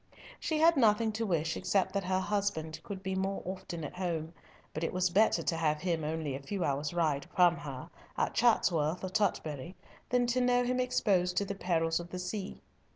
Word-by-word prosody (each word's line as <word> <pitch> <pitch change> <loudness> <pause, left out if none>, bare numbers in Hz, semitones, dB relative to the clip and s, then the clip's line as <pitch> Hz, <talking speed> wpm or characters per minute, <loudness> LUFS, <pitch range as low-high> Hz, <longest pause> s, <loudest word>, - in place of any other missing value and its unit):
She 315 - -1
had 325 +1 +5
nothing 220 -2 +4
to 220 +1 -2
wish 160 -3 0
except 195 -2 0
that 200 -2 -1
her 185 0 +1
husband 190 -6 -2
could 195 +1 -7
be 190 0 -2
more 190 +1 -2
often 180 -2 -5
at 145 - -5
home, 165 -3 -2 0.4
but 155 - -4
it - - 0
was 185 -1 +1
better 210 +5 +3
to 170 - 0
have 155 -2 0
him 170 -3 -1
only 155 -2 -2
a 135 - -5
few 190 +6 -3
hours' 145 0 -1
ride 155 -5 0
from 175 -2 +5
her, 140 +1 -7 0.3
at - - 0
Chatsworth 180 -9 +2
or 185 - -2
Tutbury, 175 -5 -1 0.3
than 245 0 +3
to 245 +1 +1
know 245 0 +3
him 250 +1 0
exposed 190 -8 +1
to 200 - +2
the 200 - -3
perils 165 -4 0
of 175 0 -8
the 180 - -5
sea. 190 +2 -5
180 Hz, 205 wpm, -31 LUFS, 160-205 Hz, 0.4 s, had